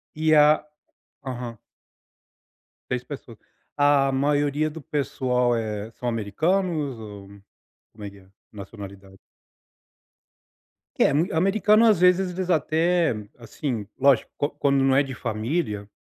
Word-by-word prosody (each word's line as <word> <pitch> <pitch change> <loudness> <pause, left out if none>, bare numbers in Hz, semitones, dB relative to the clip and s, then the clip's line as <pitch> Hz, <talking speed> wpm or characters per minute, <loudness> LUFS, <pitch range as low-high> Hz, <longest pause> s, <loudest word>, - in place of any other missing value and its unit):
E 155 0 +2
a 150 0 +5 0.6
aham. 125 -3 -6 1.3
6 125 0 -2
pessoas. 125 -5 -10 0.4
A 145 -1 +3
maioria 145 +2 +1
do 155 0 -9
pessoal, 125 -4 0
eh, 110 -1 -4
são 120 +2 -4
americanos 150 - -1
ou 105 -3 -10 0.6
como 105 -1 -13
é 100 - -5
que 100 - -16
é 95 - -19
a 95 - -25 0.2
nacionalidade? 100 -2 -11 1.8
Que - - +3
é - - +3
mui 160 +6 +1
americano 210 +6 +3
às 215 -6 +4
vezes 180 +1 +3
eles 185 0 -4
até, 165 0 +2 0.2
assim, 115 -2 -5
lógico, 140 0 +3
qua 145 - 0
quando 140 -2 +1
não 135 0 +3
é 140 - +4
de 135 -1 -7
família, 110 -1 -3
135 Hz, 130 wpm, -24 LUFS, 115-155 Hz, 1.8 s, a